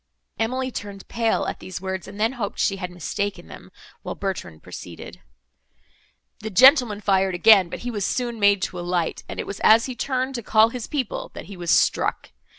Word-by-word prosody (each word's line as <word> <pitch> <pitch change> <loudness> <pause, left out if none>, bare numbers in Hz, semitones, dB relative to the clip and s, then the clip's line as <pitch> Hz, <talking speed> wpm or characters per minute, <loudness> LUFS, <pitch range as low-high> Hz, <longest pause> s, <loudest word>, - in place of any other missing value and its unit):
Emily 255 +3 -1
turned 200 -3 -7
pale, 230 -1 0
at - - -4
these 185 -1 -7
words, 190 -1 -5
and 200 +1 -10
then 220 +2 +2
hoped 235 -6 -5
she 195 - +1
had 180 -2 -5
mistaken 190 +3 -4
them; - - -13 0.3
while - - -6
Bertrand 185 - -5
proceeded: - - -10 1.2
"The 220 - -5
gentleman 245 - +6
fired 190 -2 +2
again, 195 -1 +6
but - - -7
he 245 - -4
was 205 -3 -3
soon 240 +1 -2
made 200 -1 +4
to 180 - -3
alight, 175 -1 -2
and - - -6
it - - -2
was 200 - -6
as 225 +1 +5
he 260 - -4
turned 260 +2 -2
to 240 - -4
call 220 0 +4
his 240 -1 -6
people, 270 -7 -3
that - - -8
he 200 - -10
was 175 -2 -6
struck. - - +2
205 Hz, 195 wpm, -23 LUFS, 190-235 Hz, 1.2 s, gentleman